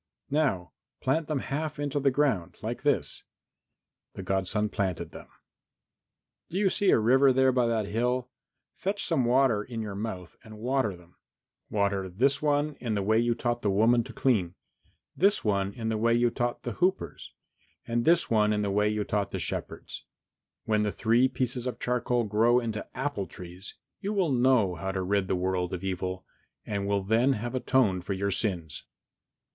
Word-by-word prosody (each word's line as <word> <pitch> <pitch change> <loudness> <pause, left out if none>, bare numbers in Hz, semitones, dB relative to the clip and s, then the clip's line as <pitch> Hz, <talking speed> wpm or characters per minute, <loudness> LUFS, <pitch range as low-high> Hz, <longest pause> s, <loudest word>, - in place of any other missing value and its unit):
"Now 135 - 0 0.3
plant 150 +4 0
them 155 - -1
half 150 +2 -3
into 145 0 -1
the 140 0 +3
ground, 130 - 0
like - - -3
this." - - 0 0.9
The 95 - -6
godson 95 +3 0
planted 90 -5 -2
them. - - -11 1.2
"Do 180 - -4
you 195 -2 +3
see 200 - +2
a - - +6
river 130 +5 +5
there 130 0 +4
by 125 -2 +2
that 115 -2 0
hill? 125 +4 -1 0.4
Fetch 200 +1 -2
some 155 -8 +1
water 125 -3 +3
in 115 +2 -6
your 105 -2 -4
mouth 95 -4 -5
and 110 -1 -12
water 120 -3 0
them. 85 0 -21 0.5
Water 100 -2 0
this 135 +10 +1
one 145 0 +1
in 115 -3 -2
the 100 - 0
way 110 +3 +3
you 120 0 +1
taught 120 0 -1
the 105 - +1
woman 115 +4 +4
to - - -9
clean, 95 -9 +1 0.6
this 200 - +3
one 100 -2 +1
in 110 +1 -4
the 110 -1 -1
way 115 +1 +3
you 120 0 +3
taught 120 0 -2
the 120 - -3
hoopers, 185 +2 -1 0.5
and 120 0 0
this 170 +4 +4
one 105 -2 +3
in 105 0 0
the 100 - -1
way 105 +1 +2
you 105 0 -1
taught 100 -1 -1
the - - -4
shepherds. - - -5 0.6
When 110 -1 +2
the 105 -1 0
three 120 +4 +3
pieces 125 -1 -2
of 125 - -3
charcoal 125 0 0
grow 115 +3 +3
into 115 -3 -4
apple 130 -8 -2
trees 90 +2 -10 0.2
you 200 +2 -3
will 185 -7 +1
know 125 -6 +3
how 95 +3 -4
to 95 -1 -2
rid 100 +1 0
the - - +1
world 90 0 -1
of 90 - -8
evil, 95 -1 -3 0.4
and 100 -1 -2
will 100 -1 +1
then 115 +7 +3
have 120 +1 -4
atoned 120 -8 +2
for 100 - -2
your 100 +1 -1
sins." 90 - -2
115 Hz, 185 wpm, -28 LUFS, 100-130 Hz, 1.2 s, a